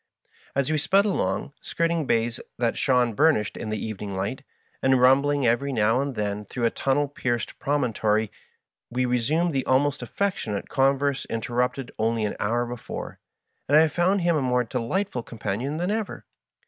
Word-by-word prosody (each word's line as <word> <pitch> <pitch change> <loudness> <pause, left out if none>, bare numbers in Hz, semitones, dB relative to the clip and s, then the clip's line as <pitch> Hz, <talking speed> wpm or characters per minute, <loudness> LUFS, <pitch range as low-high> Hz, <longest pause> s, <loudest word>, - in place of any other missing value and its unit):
As 140 +2 +1
we 155 - +2
sped 195 +7 +3
along, 105 - -1
skirting 165 -3 -1
bays 115 +1 +1 0.2
that 120 -1 0
shone 125 -3 +2
burnished 140 -5 +2
in 110 - -5
the 110 - -1
evening 105 -2 -5
light, 100 +8 -3 0.4
and 130 -1 +4
rumbling 140 +2 +4
every 120 +4 +2
now 115 +1 +2
and 140 -2 -3
then 105 -1 -2
through 120 +4 -2
a 115 - +3
tunnel 145 +2 +1
pierced 125 -6 -3
promon 140 -5 0
tory, 105 0 +1 0.6
we 125 +1 0
resumed 145 +8 +1
the 135 -1 0
almost 145 +2 +2
affectionate 150 - -2
converse 135 0 +1
inter 115 +1 -4
rupted 125 +1 0
only 110 0 +1
an 105 - -2
hour 120 +4 0
before, 120 -1 -7 0.5
and 145 - +5
I 160 +1 +6
found 180 +5 +1
him 170 -1 +2
a 150 - +1
more 125 -1 +2
delightful 125 - -2
companion 115 +6 -4
than 175 +4 -1
ever. 215 -1 -3
130 Hz, 170 wpm, -25 LUFS, 115-145 Hz, 0.6 s, I